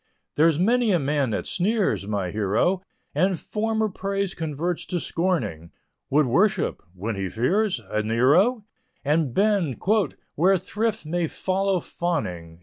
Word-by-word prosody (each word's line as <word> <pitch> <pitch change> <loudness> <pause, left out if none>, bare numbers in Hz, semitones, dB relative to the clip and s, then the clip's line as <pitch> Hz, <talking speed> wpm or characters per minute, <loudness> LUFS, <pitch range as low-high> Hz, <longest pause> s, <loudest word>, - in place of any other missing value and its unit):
There's 160 0 +4
many 230 +5 +3
a 180 - +4
man 140 -3 0
that 110 - -2
sneers, 195 - 0
my 100 -4 -2
hero, 110 - +1 0.3
And 180 +4 +1
former 220 0 -1
praise 195 -1 -2
converts 160 +2 -3
to 180 - -1
scorning, 120 - -1 0.4
Would 150 +2 +4
worship 180 - +1
when 105 +4 -3
he 95 -1 -3
fears 180 - +1
a 105 0 -1
Nero, 150 - +3 0.4
And 150 -1 +2
bend 195 - +1 0.5
"where 190 +5 +4
thrift 215 +2 -2
may 170 +2 -1
follow 190 +2 0
fawning." 90 - -3
170 Hz, 135 wpm, -24 LUFS, 120-195 Hz, 0.5 s, There's